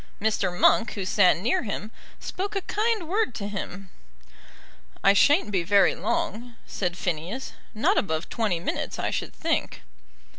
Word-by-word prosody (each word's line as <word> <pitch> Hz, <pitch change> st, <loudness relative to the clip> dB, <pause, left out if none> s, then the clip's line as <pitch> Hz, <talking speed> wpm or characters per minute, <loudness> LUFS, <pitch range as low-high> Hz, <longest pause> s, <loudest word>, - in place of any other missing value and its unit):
Mr. 205 Hz, -3 st, 0 dB
Monk, 225 Hz, -1 st, +4 dB
who 195 Hz, -3 st, -4 dB
sat 185 Hz, -2 st, +4 dB
near 215 Hz, +8 st, +1 dB
him, 210 Hz, 0 st, -5 dB, 0.3 s
spoke 400 Hz, +3 st, -4 dB
a 390 Hz, -, 0 dB
kind 430 Hz, -4 st, 0 dB
word 395 Hz, -, 0 dB
to 200 Hz, -, -4 dB
him. 195 Hz, -1 st, -6 dB, 1.1 s
"I 195 Hz, -, +6 dB
shan't 290 Hz, -, +4 dB
be 190 Hz, -3 st, +1 dB
very 195 Hz, +3 st, +4 dB
long," 235 Hz, +3 st, -3 dB
said 180 Hz, -2 st, -3 dB
Phineas; 180 Hz, +10 st, -3 dB, 0.2 s
"not 215 Hz, -, +3 dB
above 160 Hz, -3 st, -2 dB
twenty 210 Hz, -7 st, -1 dB
minutes, 170 Hz, -, -3 dB
I -, -, -1 dB
should -, -, -3 dB
think." 330 Hz, 0 st, -2 dB
205 Hz, 150 wpm, -26 LUFS, 185-255 Hz, 1.1 s, I